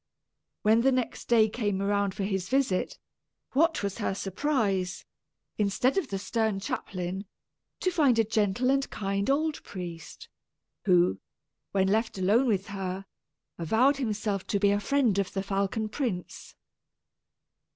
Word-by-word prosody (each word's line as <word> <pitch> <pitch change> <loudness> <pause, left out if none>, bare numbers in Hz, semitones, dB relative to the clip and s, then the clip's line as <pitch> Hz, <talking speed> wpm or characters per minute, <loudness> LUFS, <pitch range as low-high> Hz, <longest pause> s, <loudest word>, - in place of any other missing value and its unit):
When 220 +2 +5
next 255 -1 0
the 240 - +4
day 220 -1 +6
came 205 -3 -1
around 200 -1 0
for 200 - -2
his 195 -2 -2
visit, 260 -8 +1 0.5
what 315 -1 +2
was 200 +2 -3
her 200 -3 -1
surprise, 195 -3 -1 0.5
instead 210 +5 +2
of 385 -7 0
the 195 - -3
stern 215 +1 -1
chaplain, 190 0 -4 0.6
to 370 - +1
find 285 -9 +3
a 225 - +5
gentle 220 +3 +1
and 275 0 +1
kind 200 +1 -2
old 305 +2 0
priest, 175 -3 -8 0.6
who, 175 - +4 0.5
when 190 -1 +2
left 220 +2 0
alone 210 +8 +3
with 200 -4 0
her, 195 -1 -4 0.5
avowed 235 - +3
himself 210 -6 -2
to 200 - 0
be 200 0 +4
a 205 - +2
friend 235 -2 +2
of 195 - -2
the 195 - -2
falcon 200 +2 -1
prince. 215 - -4
205 Hz, 140 wpm, -28 LUFS, 195-245 Hz, 0.6 s, day